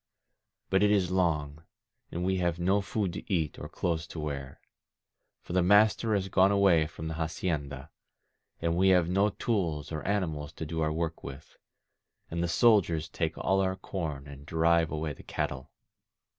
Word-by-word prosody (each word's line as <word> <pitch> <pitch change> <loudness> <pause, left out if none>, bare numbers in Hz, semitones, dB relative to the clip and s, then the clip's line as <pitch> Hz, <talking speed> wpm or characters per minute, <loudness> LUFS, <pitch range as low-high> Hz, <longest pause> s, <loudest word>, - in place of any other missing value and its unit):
But 95 +1 +3
it 105 - +5
is 95 -4 +2
long, 75 -5 0 0.5
and 90 +1 -3
we 95 0 +1
have 85 -2 0
no 95 +4 +2
food 95 -1 -2
to - - -7
eat, 80 -5 -1
or - - -7
clothes 85 -1 -2
to 85 - -8
wear. 70 -3 -5 0.8
For - - -7
the 90 - +3
master 105 +3 +4
has 95 -1 -1
gone 95 +1 +4
away 95 -6 +4
from 80 +1 -7
the 80 - -3
hacienda, 80 -3 -3 0.7
and 85 0 0
we 95 +2 +4
have 90 -3 +4
no 100 +4 +2
tools 85 -11 -2
or 80 -1 -3
animals 80 -8 -2
to 80 - -6
do 80 +1 -3
our 75 0 +1
work 80 +1 -3
with, 70 +2 -10 0.8
and 85 +1 -2
the 85 - +1
soldiers 85 -6 +3
take 80 -1 -2
all 95 0 +1
our 95 0 0
corn 80 -8 -5
and 70 -1 -11
drive 80 -1 +3
away 75 -1 -3
the - - -13
cattle. 65 -1 -4
85 Hz, 175 wpm, -29 LUFS, 75-95 Hz, 0.8 s, it